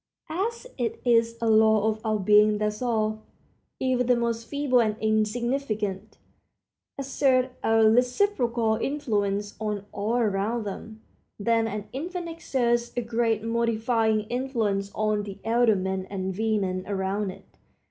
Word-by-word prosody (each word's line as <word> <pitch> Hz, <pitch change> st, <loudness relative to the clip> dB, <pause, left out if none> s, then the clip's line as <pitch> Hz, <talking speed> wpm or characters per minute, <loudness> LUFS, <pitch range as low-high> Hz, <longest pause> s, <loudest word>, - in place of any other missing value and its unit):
As 445 Hz, +9 st, -2 dB
it 235 Hz, -3 st, -2 dB
is 230 Hz, -1 st, +3 dB
a 230 Hz, -, -1 dB
law 220 Hz, -1 st, +4 dB
of 220 Hz, 0 st, -2 dB
our 215 Hz, -1 st, +1 dB
being 210 Hz, +1 st, +4 dB
that 210 Hz, +1 st, -2 dB
all, 215 Hz, -3 st, 0 dB, 0.6 s
even 255 Hz, -2 st, +1 dB
the 250 Hz, -, +5 dB
most 230 Hz, -1 st, -2 dB
feeble 280 Hz, -4 st, +2 dB
and 215 Hz, -2 st, 0 dB
insignificant, 215 Hz, -2 st, -1 dB, 0.8 s
exert 265 Hz, -2 st, +1 dB
a 225 Hz, 0 st, +4 dB
reciprocal 245 Hz, -, +2 dB
influence 210 Hz, -7 st, -1 dB
on 210 Hz, -2 st, -3 dB
all 210 Hz, +3 st, -2 dB
around 220 Hz, +1 st, 0 dB
them, 220 Hz, +2 st, -8 dB, 0.3 s
then 225 Hz, +2 st, +1 dB
an 210 Hz, -2 st, -5 dB
infant 345 Hz, +5 st, -4 dB
exerts 240 Hz, -7 st, 0 dB
a -, -, +2 dB
great 225 Hz, -2 st, 0 dB
modifying 225 Hz, -1 st, +1 dB
influence 215 Hz, -4 st, -2 dB
on 215 Hz, -1 st, +1 dB
the 200 Hz, -1 st, -7 dB
elder 230 Hz, -1 st, +3 dB
men 190 Hz, 0 st, -2 dB
and 190 Hz, -1 st, -3 dB
women 200 Hz, -4 st, 0 dB
around 195 Hz, 0 st, -1 dB
it. 185 Hz, -, -10 dB
220 Hz, 135 wpm, -26 LUFS, 210-240 Hz, 0.8 s, the